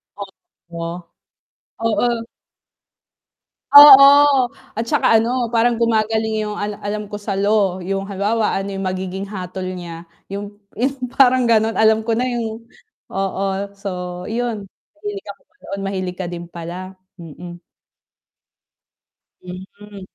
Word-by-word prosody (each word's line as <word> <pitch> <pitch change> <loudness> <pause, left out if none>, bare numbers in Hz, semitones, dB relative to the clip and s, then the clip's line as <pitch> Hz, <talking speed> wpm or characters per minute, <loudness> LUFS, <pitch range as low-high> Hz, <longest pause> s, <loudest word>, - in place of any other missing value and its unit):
O 200 - -6 0.5
o. 170 +1 -6 0.8
Oo. 230 +1 0 1.5
Oo 285 -1 +11 0.7
at 225 - -3
saka - - +2
ano, 240 +2 +2
parang 235 0 +2
gumagaling 220 -1 0
yung 210 -1 -4
alam 205 0 -4
alam 210 +1 -3
ko 205 0 -8
sa 200 -2 -3
law, 200 -2 +1
yung 195 0 -2
halimbawa 210 +3 0
yung 195 -1 -5
magiging 190 +1 -4
hatol 185 -2 -6 0.2
niya, 170 -1 -9 0.2
yung 205 +1 -7 0.2
yung 265 +4 -1 0.2
parang 255 -2 +4
ganon, 225 -1 +2
alam 220 0 +4
ko 225 0 -1
na 250 - 0
yung 230 -2 -4 0.5
oo, 195 0 -2 0.4
so 195 0 -5 0.4
yun. 230 -3 -3 0.3
Mahilig 415 0 -6
ako - - -10 0.2
doon, 195 - -6
mahilig 185 -2 -3
ka 185 - -4
din 175 0 -6
pala, 180 +3 -8 0.2
mm. 175 +2 -10 1.8
Hmm. 195 +3 -11
205 Hz, 120 wpm, -19 LUFS, 190-225 Hz, 1.8 s, Oo